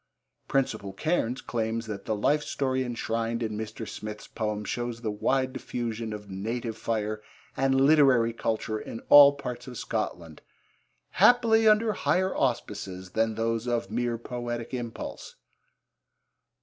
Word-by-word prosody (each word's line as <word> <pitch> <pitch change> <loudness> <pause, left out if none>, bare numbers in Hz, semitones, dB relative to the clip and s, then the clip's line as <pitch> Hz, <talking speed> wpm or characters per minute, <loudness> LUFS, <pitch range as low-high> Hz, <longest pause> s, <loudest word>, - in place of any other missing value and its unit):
Principal 110 -8 -1
Cairns 130 - -1
claims 115 0 -2
that 105 -3 -6
the 110 - 0
life 145 +8 +2
story 130 -3 -1
enshrined 115 -1 -2
in 110 -1 -2
Mr. 110 +1 -5
Smith's 105 0 -7
poems 105 -2 -3
shows 120 -1 -3
the 110 -3 -2
wide 130 +5 0
diffusion 115 -3 -4
of 105 -1 -7
native 110 +4 -4
fire 110 -1 -2 0.3
and 135 0 +2
literary 135 -5 +5
culture 110 -1 -2
in 115 - -7
all 145 -1 +10
parts 130 -3 -6
of 125 -2 -7
Scotland, 100 -9 -4 0.7
'happily 225 -2 +5
under 215 +1 +4
higher 185 0 +1
auspices 100 -7 -2
than 110 +1 +1
those 115 +1 -1
of 120 -4 -1
mere 120 +1 -1
poetic 120 0 -5
impulse.' 120 -2 -6
115 Hz, 135 wpm, -27 LUFS, 110-130 Hz, 0.7 s, all